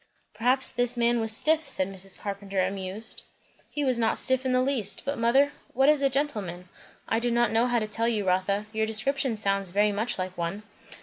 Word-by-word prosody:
"Perhaps 250 +4 +1
this 245 0 +1
man 235 0 +1
was 225 0 +2
stiff," 310 +7 +3
said 190 -9 +4
Mrs. 195 0 -2
Carpenter 200 -1 -5
amused. 195 +3 -1 0.5
"He 295 -1 -3
was 255 -3 +2
not 225 -1 +1
stiff 260 0 +3
in - - 0
the 255 - +2
least; 255 -7 +2
but 280 +1 -2
mother, 265 +5 +2 0.2
what 270 +3 +4
is 300 -2 +3
a 275 - +2
gentleman?" 210 -11 -3 0.4
"I 225 - 0
do 240 +1 -1
not 240 -1 +1
know 230 +2 +2
how 245 -1 0
to 220 - -1
tell 230 +2 -1
you, 215 -4 -1
Rotha. 190 +3 0
Your 220 0 -1
description 240 +2 -1
sounds 195 -2 -1
very 205 +3 +1
much 215 +4 -2
like 185 0 -5
one." 175 +4 -4
225 Hz, 205 wpm, -26 LUFS, 200-255 Hz, 0.5 s, said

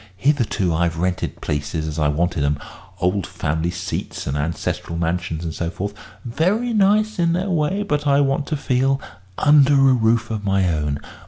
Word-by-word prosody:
Hitherto 115 - +1
I've 85 0 0
rented 90 +2 -2
places 75 +2 -2
as 80 +1 -4
I 75 - +2
wanted 80 +1 0
'em 70 +1 +1 0.4
old 90 +1 0
family 80 +3 -2
seats 90 +1 -4
and 70 - -2
ancestral 80 +2 -3
mansions 85 -1 -2
and 80 -2 -4
so 85 +1 -3
forth: 100 +3 -4 0.3
very 185 - 0
nice 210 0 +3
in 170 -1 +3
their 185 +3 -1
way, 175 +5 0
but 150 -7 -1
I 140 0 +4
want 140 0 +1
to 155 - -1
feel 135 0 +1 0.4
under 145 -1 +5
a 135 -1 +5
roof 115 -1 +2
of 110 -2 -3
my 95 -2 +2
own. 75 -2 -1
105 Hz, 175 wpm, -21 LUFS, -, 0.4 s, under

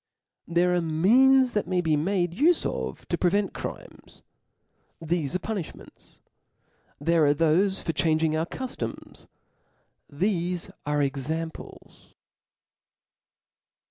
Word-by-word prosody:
There 175 +1 +2
are 175 - +2
means 245 +11 +4
thkt 210 - -1
may 185 -1 0
be 160 -3 +1
made 175 +3 0
ufe 310 - +2
of - - -4
to - - -1
prevent 195 +3 +1
crimes; - - -9 0.8
thefe 165 -2 -2
are 185 +5 -2
{»ini£hments: 185 -7 -9 0.8
there 165 +3 +2
are^thofe 165 +6 +2
for 165 - -2
changing 155 0 +1
our 160 +1 -1
cuftoms; 260 +3 -7 0.8
thefe 175 +2 -1 0.2
are 150 0 +1
examples. 155 +4 -6
170 Hz, 105 wpm, -26 LUFS, 160-195 Hz, 0.8 s, means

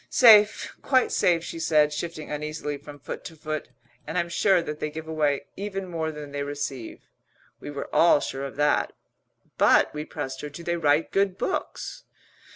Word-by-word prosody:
'" - - -40
"Safe, 215 -4 +6
quite 260 -2 +2
safe," 170 -2 +2
she 165 - -6
said, 150 -2 +3
shifting 155 0 -5
uneasily 150 0 -3
from 145 +1 -11
foot 140 - -7
to 165 - -8
foot. 155 0 -5 0.4
"And 160 - -3
I'm 170 -1 0
sure 190 +2 +3
that 150 -2 -5
they 155 - -2
give 160 +1 -8
away 150 -3 0
even 195 -1 -4
more 160 -2 -2
than 150 -2 -8
they 145 0 -3
receive." 140 -4 -5 0.6
We - - -8
were 140 -1 -5
all 170 -3 +6
sure 135 0 -4
of 135 - -7
that. 145 0 +2 0.7
"But," - - +5
we 150 0 -4
pressed 145 -5 -5
her, 150 - -5
"do 145 +4 -10
they 170 0 -1
write 150 -1 +2
good 195 -1 +1
books?" - - -4
155 Hz, 185 wpm, -26 LUFS, 145-170 Hz, 0.7 s, Safe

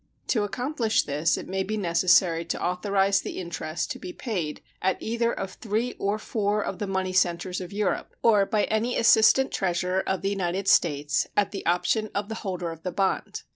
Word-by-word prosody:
To 225 - +2
accomplish 245 +1 0
this 150 +3 0
it - - -7
may 190 +1 -1
be 215 +3 -2
necessary 170 -2 +3
to 170 - -3
authorize 195 +2 +1
the - - -6
interest 170 -2 -4
to - - -5
be 180 - -7
paid 180 - -4 0.2
at 190 0 +1
either 235 +1 0
of 195 -4 -4
three 225 +2 -2
or 200 +2 0
four 210 -1 -1
of 185 - -4
the 205 - -2
money 190 -1 -1
centers 180 0 +1
of 180 - -7
Europe, 205 -1 -2
or 210 -4 +5
by 210 -1 +1
any 225 +3 0
assistant 230 +3 +5
treasurer 180 0 0
of 190 0 -1
the 195 - +1
United 190 0 -2
States, 145 -6 +2
at 205 - +2
the 200 - -5
option 215 +5 +1
of 200 +1 -2
the 220 - -4
holder 180 -4 -3
of 165 -1 -10
the 180 - -3
bond. 190 +2 -1
195 Hz, 195 wpm, -26 LUFS, 180-215 Hz, 0.2 s, or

